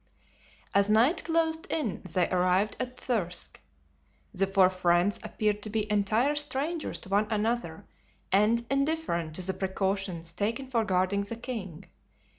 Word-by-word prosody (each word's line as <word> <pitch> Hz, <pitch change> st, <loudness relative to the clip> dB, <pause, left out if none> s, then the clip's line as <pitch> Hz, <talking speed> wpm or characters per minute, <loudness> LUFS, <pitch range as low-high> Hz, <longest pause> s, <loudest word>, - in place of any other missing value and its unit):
As 200 Hz, +1 st, +3 dB
night 240 Hz, +11 st, +4 dB
closed 325 Hz, -1 st, 0 dB
in 245 Hz, -, -2 dB
they 180 Hz, +1 st, +2 dB
arrived 185 Hz, +3 st, +2 dB
at 255 Hz, 0 st, -4 dB
Thirsk. 190 Hz, -8 st, -2 dB, 0.7 s
The 195 Hz, +1 st, +1 dB
four 190 Hz, -1 st, +4 dB
friends 180 Hz, +1 st, +2 dB
appeared 210 Hz, -1 st, -1 dB
to 215 Hz, -, -4 dB
be 215 Hz, 0 st, -1 dB
entire 215 Hz, +7 st, +2 dB
strangers 295 Hz, +3 st, -2 dB
to -, -, -6 dB
one 205 Hz, +2 st, +2 dB
another 215 Hz, -6 st, -1 dB, 0.5 s
and 215 Hz, +5 st, +3 dB
indifferent 275 Hz, -, 0 dB
to 185 Hz, -, -4 dB
the 190 Hz, +1 st, -1 dB
precautions 190 Hz, -3 st, -2 dB
taken 225 Hz, +8 st, -2 dB
for 240 Hz, -3 st, 0 dB
guarding 190 Hz, +1 st, +1 dB
the 200 Hz, +3 st, -5 dB
king. 200 Hz, -8 st, -6 dB
210 Hz, 140 wpm, -29 LUFS, 185-245 Hz, 0.7 s, night